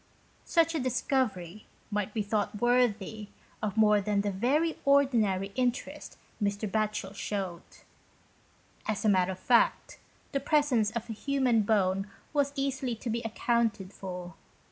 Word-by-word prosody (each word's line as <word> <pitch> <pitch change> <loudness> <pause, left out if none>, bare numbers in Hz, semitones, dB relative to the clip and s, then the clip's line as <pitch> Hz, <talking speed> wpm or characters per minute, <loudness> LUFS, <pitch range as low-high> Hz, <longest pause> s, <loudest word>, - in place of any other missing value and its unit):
Such 330 -1 +3
a 320 - 0
discovery 240 - -1 0.2
might 210 0 -1
be 215 -1 -1
thought 210 0 -1
worthy 245 +1 +4
31 210 +1 -8
GHOST 210 -1 -8
TALES. - - -27 0.4
of 215 - -17
more 210 -1 +5
than 200 0 +1
the 205 0 -1
very 280 - +1
ordinary 230 -9 +3
interest 250 +1 -2 0.2
Mr. 205 +1 0
Batohel 210 -1 -1
showed. 195 -4 -4 1.3
As 215 +1 -1
a - - +5
matter 190 -1 +3
of 185 - -12
fact, 240 +3 +2 0.3
the 275 - 0
presence 275 -6 +2
of 235 +1 -5
a 225 - -4
human 255 -1 +1
bone 195 -2 +1 0.2
was 285 -1 +2
easily 270 -3 -1
to 230 +1 -4
be 235 +1 -1
accounted 225 -3 -1
for. 180 -2 -7
220 Hz, 150 wpm, -29 LUFS, 200-250 Hz, 1.3 s, more